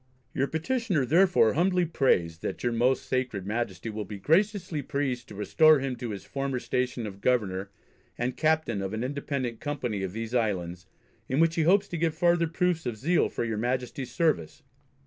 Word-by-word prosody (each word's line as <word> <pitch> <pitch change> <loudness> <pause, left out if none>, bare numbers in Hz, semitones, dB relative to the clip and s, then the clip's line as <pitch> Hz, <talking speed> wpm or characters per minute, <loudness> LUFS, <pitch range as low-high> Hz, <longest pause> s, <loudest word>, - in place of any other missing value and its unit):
Your 135 - 0
Petitioner 170 - 0
therefore 170 - +4
humbly 180 +3 +2
prays 85 - +1
that - - -5
your 120 - +1
most 125 +3 +2
sacred 125 -7 -2
Majesty 110 -1 -3
would 105 -1 -5
be 105 - -6
graciously 175 - +1
pleased 135 -3 -2
to 105 - -11
restore 155 +9 +5
him 135 -2 -2
to 120 - -5
his 100 -3 -6
former 135 -1 -2
station 125 -1 -2
of 100 -1 -8
Governor, 100 -6 0 0.5
and 125 +1 -2
Captain 155 -9 +1
of 95 +1 -4
an 110 - -3
independent 135 -3 -3
Company 125 -9 -3
of 95 -1 -3
these 115 +2 -5
Islands, 90 -7 -1 0.4
in 130 - +1
which 165 0 +4
he 165 - 0
hopes 195 +5 +4
to 170 - -4
give 165 -1 0
farther 170 0 +3
proofs 170 -1 0
of 115 -3 -3
zeal 165 +10 +2
for - - -3
your 110 -2 -2
Majesty's 125 +2 -2
service. 130 - 0
130 Hz, 185 wpm, -27 LUFS, 110-160 Hz, 0.5 s, restore